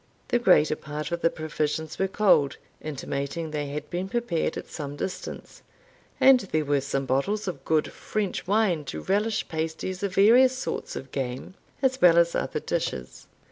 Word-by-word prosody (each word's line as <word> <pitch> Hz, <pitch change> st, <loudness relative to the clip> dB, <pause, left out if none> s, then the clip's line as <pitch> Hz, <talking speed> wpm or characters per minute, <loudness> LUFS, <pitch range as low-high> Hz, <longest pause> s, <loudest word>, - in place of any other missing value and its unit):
The 240 Hz, -, +3 dB
greater 170 Hz, -9 st, +4 dB
part 150 Hz, +1 st, -6 dB
of 170 Hz, 0 st, -2 dB
the 165 Hz, -, +4 dB
provisions 155 Hz, 0 st, -3 dB
were 195 Hz, -, +2 dB
cold, 185 Hz, -9 st, +3 dB, 0.2 s
intimating 145 Hz, +2 st, -4 dB
they 150 Hz, -1 st, -2 dB
had 145 Hz, +1 st, -5 dB
been 180 Hz, +2 st, -3 dB
prepared 230 Hz, -8 st, -1 dB
at -, -, -6 dB
some 145 Hz, -2 st, -6 dB
distance; 180 Hz, +6 st, -6 dB, 0.6 s
and 265 Hz, -1 st, +7 dB
there 160 Hz, -8 st, -1 dB
were 145 Hz, -1 st, +2 dB
some 135 Hz, 0 st, -2 dB
bottles 165 Hz, +12 st, 0 dB
of 145 Hz, -7 st, -4 dB
good 155 Hz, -1 st, +1 dB
French 205 Hz, -4 st, -3 dB
wine 195 Hz, -6 st, +2 dB
to -, -, -5 dB
relish 215 Hz, +3 st, 0 dB
pasties 160 Hz, +3 st, -3 dB
of 200 Hz, -2 st, -2 dB
various 250 Hz, +6 st, +6 dB
sorts 260 Hz, -, -4 dB
of 135 Hz, -, -7 dB
game, 130 Hz, +3 st, -4 dB, 0.3 s
as 260 Hz, 0 st, +1 dB
well 170 Hz, -2 st, +7 dB
as 170 Hz, 0 st, +4 dB
other -, -, -1 dB
dishes. 65 Hz, 0 st, -4 dB
165 Hz, 170 wpm, -26 LUFS, 145-200 Hz, 0.6 s, and